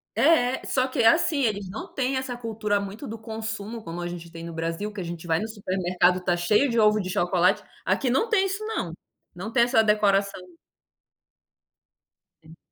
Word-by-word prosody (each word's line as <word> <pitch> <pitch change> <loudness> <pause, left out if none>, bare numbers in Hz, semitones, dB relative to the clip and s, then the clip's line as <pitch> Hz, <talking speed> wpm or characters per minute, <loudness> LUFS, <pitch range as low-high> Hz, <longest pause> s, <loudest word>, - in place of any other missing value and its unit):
É, 260 -6 +3
só 255 -1 +1
que 260 -2 0
assim, 315 +4 +4
eles 205 -5 -1
não 200 - -8
têm 265 0 0
essa 260 -1 -3
cultura 220 -3 -1
muito 200 +7 -7
do 225 +1 -7
consumo 220 0 -6
como 170 -1 -6
a 175 - -3
gente 170 -1 -8
tem 165 -1 -9
no 170 - -6
Brasil, 165 +6 -3
que 210 - -8
a - - -3
gente 170 0 -7
vai 160 -1 +2
no 220 - -3
supermercado, 185 -3 +1
tá 175 -1 +2
cheio 210 +10 +2
de 230 - +1
ovo 215 0 +5
de 185 -2 -3
chocolate, 180 0 +2 0.2
aqui 265 - +1
não 265 - +2
tem 435 -4 +3
isso 395 +3 -4
não, 185 - -3 0.4
não 195 +6 -6
tem 235 0 +4
essa 235 -2 +4
decoração. 200 -2 +2 2.0
Hum. 160 +1 -16
210 Hz, 190 wpm, -25 LUFS, 180-245 Hz, 2.0 s, ovo